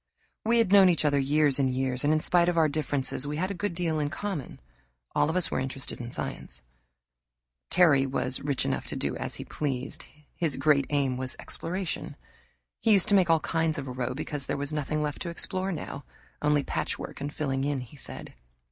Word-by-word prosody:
We 230 Hz, +2 st, +3 dB
had 230 Hz, -5 st, +3 dB
known 195 Hz, -2 st, +8 dB
each 165 Hz, -3 st, +2 dB
other 145 Hz, -1 st, +3 dB
years 145 Hz, 0 st, +3 dB
and 135 Hz, -1 st, +3 dB
years, 130 Hz, 0 st, -1 dB
and 145 Hz, -, +3 dB
in 155 Hz, 0 st, +3 dB
spite 175 Hz, +1 st, +4 dB
of 175 Hz, -, -1 dB
our 160 Hz, -1 st, +5 dB
differences 145 Hz, -2 st, -1 dB
we 150 Hz, +1 st, -3 dB
had 185 Hz, +4 st, -1 dB
a -, -, -1 dB
good 200 Hz, -1 st, -3 dB
deal 165 Hz, -3 st, 0 dB
in 145 Hz, -1 st, 0 dB
common. 180 Hz, -3 st, -4 dB, 0.5 s
All -, -, +3 dB
of 160 Hz, -, -1 dB
us 185 Hz, -3 st, +1 dB
were -, -, 0 dB
interested 130 Hz, -1 st, -4 dB
in 120 Hz, 0 st, -6 dB
science. -, -, -6 dB, 1.1 s
Terry 150 Hz, -7 st, +5 dB
was 130 Hz, -1 st, -1 dB
rich 140 Hz, -2 st, -1 dB
enough -, -, -1 dB
to -, -, -3 dB
do -, -, -1 dB
as -, -, -4 dB
he -, -, -7 dB
pleased. 135 Hz, -3 st, -3 dB, 0.3 s
His 160 Hz, -5 st, +1 dB
great 140 Hz, -3 st, +3 dB
aim 140 Hz, -3 st, +1 dB
was 130 Hz, 0 st, -3 dB
exploration. 180 Hz, +2 st, -3 dB, 0.6 s
He 225 Hz, -, +4 dB
used 195 Hz, -3 st, +4 dB
to 205 Hz, -, +5 dB
make 185 Hz, -3 st, +4 dB
all 165 Hz, -1 st, +4 dB
kinds 160 Hz, -1 st, 0 dB
of 140 Hz, -1 st, -4 dB
a -, -, -4 dB
row 125 Hz, 0 st, -2 dB
because 145 Hz, -1 st, -4 dB
there -, -, -1 dB
was 145 Hz, +2 st, -3 dB
nothing 150 Hz, 0 st, -1 dB
left 145 Hz, -1 st, -3 dB
to 175 Hz, -, -3 dB
explore 185 Hz, +3 st, -2 dB
now, 155 Hz, -4 st, -5 dB, 0.4 s
only 150 Hz, -1 st, +3 dB
patchwork -, -, -3 dB
and 145 Hz, +1 st, -3 dB
filling 135 Hz, -3 st, -1 dB
in, 140 Hz, -2 st, 0 dB
he 125 Hz, +3 st, -11 dB
said. 140 Hz, -, -9 dB
150 Hz, 210 wpm, -28 LUFS, 135-170 Hz, 1.1 s, known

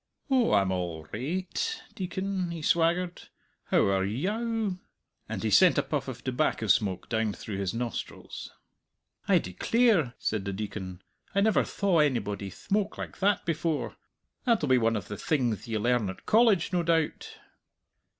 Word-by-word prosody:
"Oh, 255 Hz, -3 st, +4 dB
I'm 100 Hz, -2 st, +3 dB
all 85 Hz, -4 st, -3 dB
rai 135 Hz, +11 st, -2 dB
ight, 450 Hz, -, -3 dB
Deacon," 190 Hz, 0 st, -3 dB
he 165 Hz, -2 st, -6 dB
swaggered; 170 Hz, +2 st, +1 dB, 0.4 s
"how -, -, +3 dB
are 95 Hz, -1 st, +2 dB
ye 115 Hz, -, -1 dB
ow?" 220 Hz, -3 st, -1 dB, 0.5 s
and -, -, -4 dB
he -, -, 0 dB
sent -, -, +6 dB
a -, -, +3 dB
puff -, -, -2 dB
of -, -, -7 dB
tobacco -, -, 0 dB
smoke 95 Hz, -3 st, +1 dB
down 110 Hz, -2 st, 0 dB
through 100 Hz, 0 st, -6 dB
his 95 Hz, -2 st, -1 dB
nostrils. 120 Hz, -1 st, -5 dB, 0.8 s
"I -, -, +5 dB
declare!" 165 Hz, -, +2 dB
said 105 Hz, -3 st, -2 dB
the 100 Hz, -, -2 dB
Deacon. 95 Hz, -3 st, -6 dB, 0.3 s
"I 200 Hz, -, +4 dB
never 215 Hz, +1 st, +4 dB
thaw 195 Hz, -5 st, +1 dB
onybody 105 Hz, -8 st, 0 dB
thmoke 200 Hz, -, -2 dB
like -, -, -7 dB
that 200 Hz, +1 st, +2 dB
before! 165 Hz, -1 st, -1 dB, 0.5 s
That'll 230 Hz, -, +2 dB
be 130 Hz, -1 st, +5 dB
one 115 Hz, 0 st, +2 dB
of 100 Hz, -4 st, -4 dB
the 105 Hz, -, -6 dB
thingth 125 Hz, -9 st, 0 dB
ye 115 Hz, -1 st, -1 dB
learn 120 Hz, -1 st, +1 dB
at 95 Hz, -, -9 dB
College, 215 Hz, -6 st, +4 dB
no 175 Hz, -, +3 dB
doubt." 165 Hz, -2 st, 0 dB
150 Hz, 160 wpm, -28 LUFS, -, 0.8 s, sent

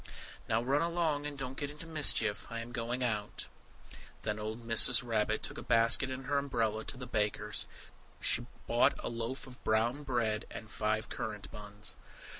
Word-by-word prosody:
"Now 110 Hz, +1 st, +2 dB
run 140 Hz, +4 st, +2 dB
along, 165 Hz, -4 st, 0 dB
and 145 Hz, -1 st, -7 dB
don't 130 Hz, -1 st, -5 dB
get 140 Hz, -, -2 dB
into 150 Hz, +2 st, -8 dB
mischief. 145 Hz, -10 st, +4 dB
I 115 Hz, -, -5 dB
am 115 Hz, +1 st, -8 dB
going 120 Hz, +1 st, -2 dB
out." 105 Hz, -4 st, -2 dB, 0.8 s
Then 105 Hz, 0 st, -2 dB
old 110 Hz, +2 st, -5 dB
Mrs. 115 Hz, +1 st, +7 dB
Rabbit 110 Hz, -2 st, 0 dB
took -, -, -3 dB
a -, -, -6 dB
basket 115 Hz, +4 st, +3 dB
and 130 Hz, 0 st, -5 dB
her 140 Hz, +1 st, +2 dB
umbrella, 125 Hz, -6 st, 0 dB
and -, -, -7 dB
went 110 Hz, -, -7 dB
through 135 Hz, -, -2 dB
the -, -, -4 dB
wood 125 Hz, -, -15 dB
to -, -, -28 dB
the -, -, +3 dB
baker's. 105 Hz, 0 st, -1 dB, 0.5 s
She -, -, +1 dB, 0.2 s
bought -, -, +3 dB
a -, -, -2 dB
loaf 120 Hz, +3 st, -4 dB
of 130 Hz, -1 st, -14 dB
brown 115 Hz, +6 st, +1 dB
bread 120 Hz, -6 st, -1 dB
and 110 Hz, -1 st, -9 dB
five 110 Hz, 0 st, -1 dB
currant 105 Hz, -3 st, -5 dB
buns. 105 Hz, 0 st, -3 dB
115 Hz, 200 wpm, -33 LUFS, 110-135 Hz, 0.8 s, Mrs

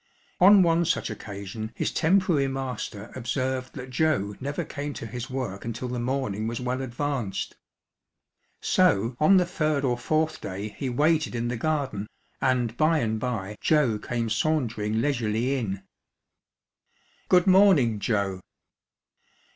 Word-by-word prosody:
On 195 Hz, +1 st, +8 dB
one 170 Hz, 0 st, +3 dB
such 165 Hz, -, 0 dB
occasion 105 Hz, +2 st, -7 dB
his -, -, -1 dB
temporary 170 Hz, -4 st, +2 dB
master 125 Hz, -6 st, -5 dB
observed 130 Hz, +1 st, -2 dB
that 130 Hz, -1 st, -7 dB
Joe 130 Hz, -8 st, +1 dB
never 140 Hz, +2 st, -3 dB
came 145 Hz, -1 st, -5 dB
to -, -, -6 dB
his 120 Hz, +2 st, -6 dB
work 130 Hz, -7 st, -4 dB
until 115 Hz, +2 st, -4 dB
the 125 Hz, 0 st, -3 dB
morning 120 Hz, -4 st, -2 dB
was 115 Hz, 0 st, -3 dB
well 125 Hz, +1 st, -2 dB
advanced. 130 Hz, -4 st, -3 dB, 1.1 s
So 125 Hz, -, +2 dB
on 190 Hz, +6 st, +6 dB
the 180 Hz, -, +4 dB
third 155 Hz, -5 st, 0 dB
or 120 Hz, -2 st, 0 dB
fourth 155 Hz, +2 st, 0 dB
day 100 Hz, +3 st, -5 dB
he 130 Hz, +5 st, -4 dB
waited 150 Hz, +2 st, +1 dB
in 120 Hz, 0 st, -1 dB
the 125 Hz, -, -2 dB
garden, 135 Hz, -6 st, -2 dB, 0.3 s
and 125 Hz, -3 st, +1 dB
by 155 Hz, +4 st, +3 dB
and 110 Hz, -6 st, 0 dB
by 105 Hz, -4 st, -3 dB
Joe 140 Hz, -9 st, +2 dB
came 115 Hz, 0 st, -3 dB
sauntering 115 Hz, -5 st, 0 dB
leisurely 125 Hz, -2 st, 0 dB
in. 100 Hz, -7 st, -3 dB, 0.7 s
" -, -, -40 dB
Good 180 Hz, -1 st, +5 dB
morning, 185 Hz, -, +5 dB
Joe." 100 Hz, -3 st, -1 dB
125 Hz, 140 wpm, -26 LUFS, 110-150 Hz, 1.1 s, On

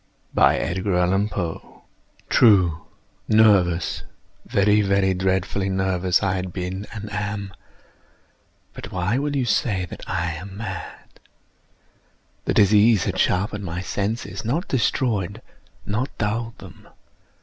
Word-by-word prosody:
True!—nervous—very, 100 Hz, +1 st, +2 dB
very 100 Hz, -1 st, +2 dB
dreadfully 95 Hz, +1 st, 0 dB
nervous 95 Hz, 0 st, +1 dB
I 95 Hz, -1 st, +1 dB
had 95 Hz, -1 st, -3 dB
been 95 Hz, +2 st, -5 dB
and 105 Hz, -1 st, -7 dB
am; 105 Hz, -1 st, -3 dB, 1.2 s
but -, -, -9 dB
why 95 Hz, +7 st, 0 dB
will 145 Hz, 0 st, -2 dB
you 130 Hz, -3 st, +1 dB
say 100 Hz, -3 st, 0 dB
that 80 Hz, -, -10 dB
I 85 Hz, 0 st, -1 dB
am 95 Hz, +5 st, -8 dB
mad? 110 Hz, +1 st, -8 dB, 1.3 s
The -, -, 0 dB
disease 105 Hz, -1 st, +5 dB
had -, -, -2 dB
sharpened 100 Hz, +2 st, 0 dB
my 85 Hz, 0 st, -4 dB
senses—not 105 Hz, -, -3 dB
destroyed—not 110 Hz, 0 st, -2 dB
dulled 115 Hz, +2 st, -2 dB
them. -, -, -14 dB
100 Hz, 95 wpm, -23 LUFS, 95-110 Hz, 1.3 s, disease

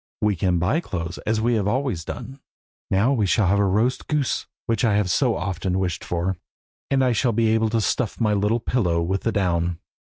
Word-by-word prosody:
We 105 Hz, -1 st, +1 dB
can 90 Hz, 0 st, +1 dB
buy 95 Hz, -, +1 dB
clothes, 85 Hz, -, -5 dB
as 110 Hz, 0 st, +1 dB
we 120 Hz, +2 st, +2 dB
have 105 Hz, -3 st, +1 dB
always 120 Hz, -, -1 dB
done. 135 Hz, -, -7 dB, 0.5 s
Now 105 Hz, +8 st, +3 dB
we 110 Hz, -7 st, +1 dB
shall 105 Hz, +2 st, +3 dB
have 100 Hz, +2 st, +2 dB
roast 105 Hz, +6 st, +1 dB
goose, 150 Hz, -4 st, -1 dB, 0.2 s
which 115 Hz, -1 st, 0 dB
I 110 Hz, -4 st, +3 dB
have 100 Hz, -3 st, +1 dB
so -, -, +2 dB
often 90 Hz, 0 st, -2 dB
wished 90 Hz, -3 st, -2 dB
for, 90 Hz, +1 st, -2 dB, 0.5 s
and 135 Hz, -1 st, +2 dB
I 125 Hz, -, +3 dB
shall 120 Hz, 0 st, +1 dB
be 115 Hz, 0 st, +2 dB
able 110 Hz, 0 st, +2 dB
to 115 Hz, 0 st, +1 dB
stuff 110 Hz, 0 st, -1 dB
my 110 Hz, -3 st, +2 dB
little 105 Hz, +3 st, +1 dB
pillow 90 Hz, -9 st, 0 dB
with 95 Hz, +3 st, -1 dB
the 115 Hz, -, 0 dB
down. 85 Hz, -4 st, 0 dB
105 Hz, 205 wpm, -23 LUFS, 90-115 Hz, 0.5 s, Now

